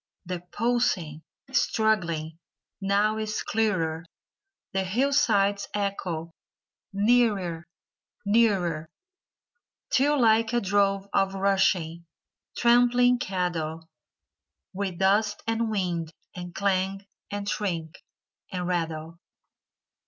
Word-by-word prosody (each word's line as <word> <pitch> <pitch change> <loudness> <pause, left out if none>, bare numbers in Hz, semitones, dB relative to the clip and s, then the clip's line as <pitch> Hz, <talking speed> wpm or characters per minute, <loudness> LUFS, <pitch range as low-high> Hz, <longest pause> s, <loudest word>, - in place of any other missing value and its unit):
The 180 0 -4
pulsing, 210 -10 0 0.3
struggling, 185 -10 0 0.4
now 205 +2 +2
is 215 0 -2
clearer! 180 -7 0 0.7
The 190 0 +1
hillsides 205 -3 +2
echo 180 -5 -3 0.6
nearer, 200 -6 +2 0.6
nearer," 195 -8 +2 1.0
Till 285 +1 +3
like 225 0 +3
a 240 - +3
drove 195 -1 +1
of 195 0 +2
rushing, 190 -4 +1 0.5
trampling 245 +1 +4
cattle. 165 -5 -3 0.9
With 190 -2 -3
dust 205 +2 +2
and 225 0 0
wind 175 -6 -2 0.2
and 175 -1 -8
clang 195 0 0 0.2
and 205 0 -4
shriek 170 -6 -3 0.5
and 180 -1 -3
rattle. 165 -2 -3
195 Hz, 85 wpm, -26 LUFS, 175-220 Hz, 1.0 s, trampling